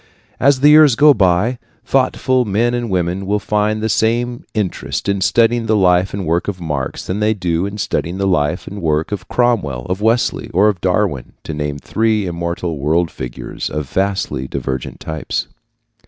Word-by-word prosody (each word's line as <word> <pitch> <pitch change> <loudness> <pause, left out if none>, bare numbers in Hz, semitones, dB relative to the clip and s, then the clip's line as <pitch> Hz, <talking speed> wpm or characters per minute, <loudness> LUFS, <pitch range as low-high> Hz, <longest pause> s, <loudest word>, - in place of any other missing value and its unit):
As 140 -1 +3
the 145 - +7
years 150 -4 +7
go 150 +2 +6
by, 100 +4 +2 0.3
thoughtful 130 -1 +2
men 115 +3 +1
and 120 -1 -2
women 90 +1 -1
will 105 +1 +1
find 105 +1 0
the - - +1
same 120 +2 0
interest 105 -2 -2
in 100 -1 0
studying 115 +3 +2
the 110 - +3
life 90 -1 +3
and 100 -2 -4
work 85 +2 0
of 100 -3 -3
Marx 75 -6 -4
that - - -2
they 110 +1 +2
do 90 -1 -1
in 100 +1 -7
studying 90 -3 -2
the 100 - -1
life 90 -3 0
and 100 +1 -7
work 80 +1 0
of 95 -3 -4
Cromwell, 95 - 0
of 95 +2 -3
Wesley, 115 +3 +1
or 100 +4 +5
of 95 -4 -3
Darwin, 95 - 0
to - - -5
name 75 -1 -3
three 110 +6 0
immortal 85 -2 -3
world 80 +3 +1
figures - - -6
of 75 -3 -4
vastly 95 -9 -1
divergent 65 -1 -4
types. 80 -1 -4
95 Hz, 180 wpm, -17 LUFS, 85-110 Hz, 0.3 s, the